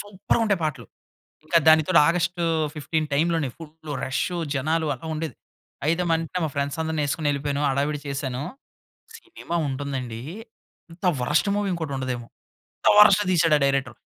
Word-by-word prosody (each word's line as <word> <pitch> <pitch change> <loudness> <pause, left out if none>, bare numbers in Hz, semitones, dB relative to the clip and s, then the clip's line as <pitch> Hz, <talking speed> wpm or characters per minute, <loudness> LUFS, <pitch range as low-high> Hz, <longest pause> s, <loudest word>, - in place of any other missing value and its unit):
Super 205 +2 -2
ఉంటాయి 200 -5 +1
పాటలు. 135 -7 -3 0.6
ఇంకా 170 +2 +3
దానితోటి 160 +2 +6
ఆగస్ట్ 175 +1 0 0.4
15 155 +1 -2
టైమ్‌లోనే 160 -1 +1
ఫుల్లు 155 -1 -9
రషు 140 +7 -2 0.2
జనాలు 160 +4 0
అలా 130 - -12
ఉండేది. 155 0 -4 0.5
ఐతే 170 +2 +1
మా 165 - +4
వెంట 165 +2 -5
మా - - -2
ఫ్రెండ్స్ 140 +1 -2
అందరినేసుకొని 155 -1 -1
ఎళ్ళిపోయాను. 140 0 -2
హడావిడి 145 +2 0
చేశాను. 135 -2 -3 0.8
సినిమా 350 - -6
ఉంటుందండి. 130 -4 -4 0.7
అంత 165 +3 -13 0.2
వరస్ట్ 150 +10 +1
మూవీ 205 -1 0
ఇంకోటుండదేమో. 135 -7 -3 0.5
అంత - - +2
వరస్ట్ 210 -1 +8
తీసాడు 165 -3 +4
ఆ - - -7
డైరెక్టర్. 135 -4 0
155 Hz, 140 wpm, -24 LUFS, 140-170 Hz, 0.8 s, వరస్ట్